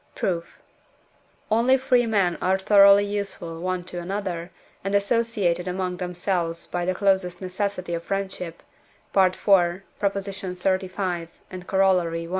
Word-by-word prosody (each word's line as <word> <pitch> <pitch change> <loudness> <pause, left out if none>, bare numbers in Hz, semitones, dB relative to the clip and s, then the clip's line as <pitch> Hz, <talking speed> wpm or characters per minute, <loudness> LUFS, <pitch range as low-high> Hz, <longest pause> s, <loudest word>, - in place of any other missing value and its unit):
Proof. 170 -2 -3 0.9
Only 240 +4 +4
free 250 -2 +2
men 195 -6 +2
are 190 +1 +2
thoroughly 200 +1 +6
useful 200 -5 -4
one 185 0 -2
to 180 0 -6
another, 180 -2 -4 0.3
and 195 +1 -1
associated 200 -4 +1
among 180 0 -2
themselves 175 -2 -2
by 175 -1 -3
the 185 +1 0
closest 190 -3 +1
necessity 185 -1 -3
of 165 - -2
friendship 190 -3 -4 0.5
(IV. 190 -2 +5
xxxv., 190 -1 0 0.2
and 185 -1 -8
Coroll. 190 -3 +2
i.) 165 0 -5
185 Hz, 120 wpm, -24 LUFS, 175-200 Hz, 0.9 s, thoroughly